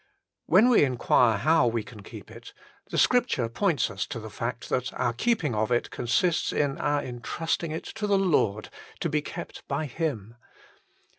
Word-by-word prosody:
When 210 +8 +6
we 240 - +5
inquire 125 -3 +3
how 155 +2 +3
we 115 -1 -1
can 105 0 -12
keep - - -11
it, - - -12 0.3
Scripture 240 - +2
points 145 - 0
us 95 -1 -3
to 115 - -5
the 110 -1 -9
fact 115 +2 -4
that 125 0 -1
our 120 - 0
keeping 175 - 0
of 110 +2 -1
it 120 - 0
consists 170 +8 +1
in 145 -2 0
our 145 0 0
intrusting 155 +7 -3
it 160 +1 -5 0.2
to 210 - 0
the 200 -1 +3
Lord 130 - +1 0.3
to - - 0
be - - 0
kept - - -8
by 155 - -2
Him. 120 - -4
130 Hz, 170 wpm, -27 LUFS, 115-165 Hz, 0.3 s, When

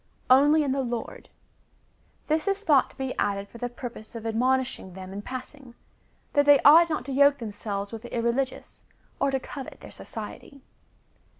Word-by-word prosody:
Only 295 +4 +6
in 280 - -1
the 270 +1 0
Lord. 240 -3 -5 1.0
This 315 +4 0
is 395 +1 0
thought 290 -8 +4
to - - -19
be 265 -1 -3
added 200 0 -1
for 235 - -13
the 245 - -3
purpose 240 -2 -9
of 225 -1 -7
admonishing 250 -3 0
them 190 0 -9
in 200 - -5
passing, 255 +1 -9 0.6
that 285 0 +3
they 290 -1 +8
ought 330 +4 +7
not 305 -5 -2
to 275 - -5
yoke 280 +1 +5
themselves 205 -3 -5
with 225 -1 -7
the 240 - -10
irreligious, 240 +3 -2 0.4
or 275 - +2
to 270 0 0
covet 270 +1 -9
their - - -11
society. 280 -3 -9
260 Hz, 175 wpm, -26 LUFS, 230-280 Hz, 1.0 s, they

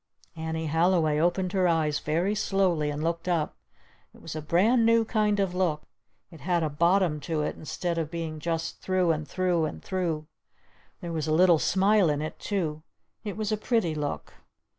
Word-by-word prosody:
_" - - -7
Annie 160 0 -3
Halliway 160 -1 +2
opened 175 +2 +1
her 185 -2 +3
eyes 155 -3 +1
very 170 +7 0
slowly 190 -7 +1
and 145 +1 -3
looked 170 +1 -2
up. 165 -4 0 0.6
It - - -16
was - - -6
a 155 - -3
brand 205 +10 +3
new 230 0 +4
kind 210 -2 +1
of 195 -2 0
a - - -5
look. 155 -5 0 0.5
It 160 -4 -13
had 175 +2 0
a 155 - -1
bottom 170 +1 +2
to 155 0 -2
it - - -2
instead 170 +2 -3
of 160 -2 -2
being 160 -2 -5
just 165 0 -3
through 185 -2 +1
and 155 -1 -2
through 175 0 +1
and 155 - -6
through. 170 -5 -2 0.8
There 170 -2 -5
was 160 -1 -2
a - - 0
little 170 0 +5
smile 195 0 +3
in 145 -1 0
it 155 +1 -5
too. 160 -7 -2 0.4
It 205 -3 -5
was 215 0 -2
a 215 - +1
pretty 215 -6 0
look. 150 -2 -4
170 Hz, 195 wpm, -27 LUFS, 155-190 Hz, 0.8 s, little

